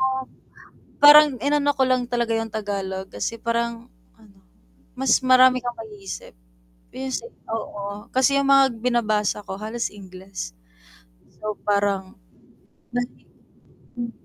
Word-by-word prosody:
Oo, 265 Hz, 0 st, +1 dB, 0.8 s
parang 300 Hz, +1 st, +10 dB
inano 290 Hz, +1 st, +2 dB
ko 270 Hz, -, +1 dB
lang 255 Hz, -1 st, +2 dB
talaga 235 Hz, -1 st, 0 dB
yung 225 Hz, 0 st, -4 dB
Tagalog 195 Hz, -3 st, -4 dB
kasi 105 Hz, -, -3 dB
parang 235 Hz, +1 st, -2 dB, 0.3 s
ano, 205 Hz, -3 st, -20 dB, 0.6 s
mas 265 Hz, -3 st, +4 dB
marami 255 Hz, 0 st, +6 dB
kang 240 Hz, -1 st, -4 dB
maiisip 210 Hz, -3 st, -9 dB, 0.6 s
pe 265 Hz, 0 st, -4 dB
s 255 Hz, -, -1 dB, 0.3 s
oo 205 Hz, -2 st, -5 dB
kasi 270 Hz, +2 st, +3 dB
yung 280 Hz, -, +1 dB
mga 275 Hz, 0 st, +7 dB, 0.2 s
binabasa 215 Hz, -4 st, +1 dB
ko 190 Hz, -, -6 dB
halos 220 Hz, +3 st, -3 dB
Ingles. 190 Hz, -, -9 dB, 0.9 s
So 215 Hz, -1 st, -4 dB
parang, 200 Hz, -2 st, 0 dB, 0.8 s
nahi 245 Hz, 0 st, -4 dB, 0.7 s
hmm. 235 Hz, -1 st, -4 dB
230 Hz, 120 wpm, -23 LUFS, 205-255 Hz, 0.9 s, parang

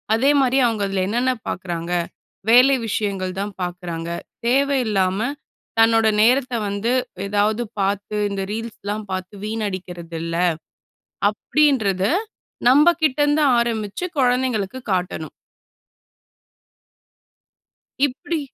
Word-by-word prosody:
அதேமாரி 270 Hz, +1 st, +3 dB
அவங்க 220 Hz, -3 st, -1 dB
அதுல 195 Hz, -1 st, -1 dB
என்னென்ன 245 Hz, +5 st, +1 dB, 0.2 s
பார்க்குறாங்க? 175 Hz, -2 st, -4 dB, 0.6 s
வேலை 250 Hz, +4 st, +7 dB
விஷயங்கள் 195 Hz, -3 st, -2 dB
தான் 205 Hz, 0 st, -4 dB
பார்க்குறாங்க. 175 Hz, -2 st, -5 dB, 0.4 s
தேவை 275 Hz, +3 st, +3 dB
இல்லாம 190 Hz, -2 st, +1 dB, 0.6 s
தன்னோட 225 Hz, 0 st, +5 dB
நேரத்த 255 Hz, +3 st, +3 dB, 0.2 s
வந்து 200 Hz, +4 st, -1 dB, 0.4 s
ஏதாவது, 210 Hz, +3 st, +1 dB, 0.2 s
பார்த்து 200 Hz, +2 st, -1 dB
இந்த 200 Hz, -1 st, -3 dB
ரீல்ஸ்லாம் 215 Hz, -1 st, -5 dB
பார்த்து 185 Hz, +2 st, -5 dB
வீணடிக்கிறதில்ல." 175 Hz, -6 st, -4 dB, 0.9 s
அப்படின்றத 220 Hz, -7 st, +1 dB, 0.6 s
நம்பகிட்டேருந்து 295 Hz, 0 st, +4 dB, 0.2 s
ஆரம்பிச்சு 225 Hz, -, -2 dB
கொழந்தைங்களுக்கு 250 Hz, -3 st, +1 dB
காட்டணும். 180 Hz, -4 st, -2 dB, 2.7 s
இப்டி 285 Hz, +5 st, -3 dB
215 Hz, 85 wpm, -21 LUFS, 190-255 Hz, 2.7 s, வேலை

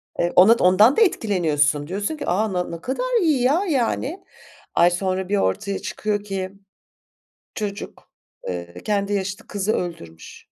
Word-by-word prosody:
Ev 175 Hz, -, 0 dB
onot 220 Hz, +6 st, +6 dB
ondan 205 Hz, +9 st, +5 dB
da -, -, +4 dB
etkileniyorsun, 155 Hz, -, +1 dB
diyorsun 205 Hz, -, -3 dB
ki, -, -, -5 dB
"A, 200 Hz, +3 st, 0 dB
na 180 Hz, -1 st, 0 dB
ne 170 Hz, -1 st, -7 dB
kadar 475 Hz, -, -1 dB
iyi, 310 Hz, -7 st, +2 dB
ya, 295 Hz, +10 st, +2 dB
yani." 280 Hz, +6 st, -1 dB, 0.5 s
Ay, 175 Hz, -, +5 dB
sonra 185 Hz, +1 st, -2 dB
bir 205 Hz, -, +1 dB
ortaya 195 Hz, -, -1 dB
çıkıyor 210 Hz, -1 st, -3 dB
ki 190 Hz, -2 st, -4 dB, 1.0 s
çocuk, 205 Hz, -2 st, -6 dB, 0.4 s
eee, 85 Hz, 0 st, -6 dB
kendi 205 Hz, -1 st, -1 dB
yaşıtı 200 Hz, 0 st, -3 dB
kızı 205 Hz, +1 st, -1 dB
öldürmüş. 85 Hz, -, -6 dB
200 Hz, 145 wpm, -22 LUFS, 175-230 Hz, 1.0 s, onot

